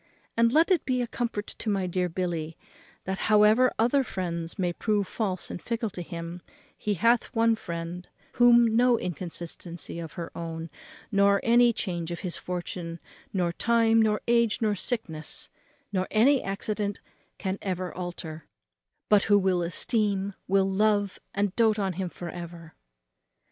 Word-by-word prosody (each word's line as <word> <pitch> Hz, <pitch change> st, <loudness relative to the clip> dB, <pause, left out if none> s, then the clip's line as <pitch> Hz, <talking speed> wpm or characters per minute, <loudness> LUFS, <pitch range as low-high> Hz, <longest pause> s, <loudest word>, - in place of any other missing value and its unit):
And 230 Hz, 0 st, +4 dB
let 320 Hz, +7 st, +4 dB
it 365 Hz, -, +3 dB
be 255 Hz, -1 st, 0 dB
a -, -, -1 dB
comfort 230 Hz, -3 st, -3 dB
to 220 Hz, -, -6 dB
my 195 Hz, -2 st, +1 dB
dear 180 Hz, 0 st, -1 dB
Billy, 165 Hz, -2 st, -3 dB, 0.5 s
that, 190 Hz, +1 st, -3 dB
however 215 Hz, +4 st, +6 dB
other 245 Hz, +5 st, +3 dB
friends 170 Hz, -6 st, -4 dB
may 180 Hz, -3 st, 0 dB
prove 205 Hz, 0 st, 0 dB
false 190 Hz, -5 st, -3 dB
and -, -, -6 dB
fickle 230 Hz, -2 st, -2 dB
to 180 Hz, -, -6 dB
him, 170 Hz, 0 st, -6 dB, 0.3 s
he 210 Hz, -1 st, -2 dB
hath 230 Hz, +5 st, +3 dB
one 230 Hz, 0 st, +4 dB
friend, 170 Hz, -2 st, -6 dB, 0.2 s
whom 240 Hz, -2 st, +5 dB
no 245 Hz, 0 st, +5 dB
inconstancy 170 Hz, -1 st, -4 dB
of 165 Hz, -3 st, -7 dB
her 170 Hz, -1 st, -7 dB
own, 165 Hz, -1 st, -5 dB, 0.4 s
nor 200 Hz, -1 st, +4 dB
any 240 Hz, +1 st, +5 dB
change 175 Hz, -6 st, -3 dB
of 170 Hz, -, -5 dB
his 180 Hz, -4 st, -3 dB
fortune, 175 Hz, -1 st, -5 dB, 0.3 s
nor 175 Hz, -3 st, 0 dB
time, 225 Hz, +2 st, +3 dB
nor 215 Hz, -1 st, +2 dB
age, 235 Hz, -1 st, +3 dB
nor 215 Hz, -3 st, +1 dB
sickness, 185 Hz, -7 st, -3 dB, 0.4 s
nor 185 Hz, -1 st, 0 dB
any 260 Hz, +5 st, +4 dB
accident, 200 Hz, +1 st, -3 dB, 0.4 s
can 190 Hz, 0 st, -3 dB
ever 185 Hz, -2 st, -3 dB
alter; 170 Hz, -3 st, -7 dB, 0.6 s
but 210 Hz, -2 st, +4 dB
who 205 Hz, 0 st, +5 dB
will 190 Hz, -2 st, +2 dB
esteem, 200 Hz, +2 st, 0 dB
will 195 Hz, 0 st, +3 dB
love, 205 Hz, 0 st, +1 dB, 0.2 s
and 200 Hz, -1 st, 0 dB
doat 220 Hz, -2 st, +3 dB
on 195 Hz, -3 st, -1 dB
him 185 Hz, +1 st, -3 dB
for 170 Hz, 0 st, -7 dB
ever." 170 Hz, -2 st, -9 dB
195 Hz, 155 wpm, -27 LUFS, 175-225 Hz, 0.6 s, however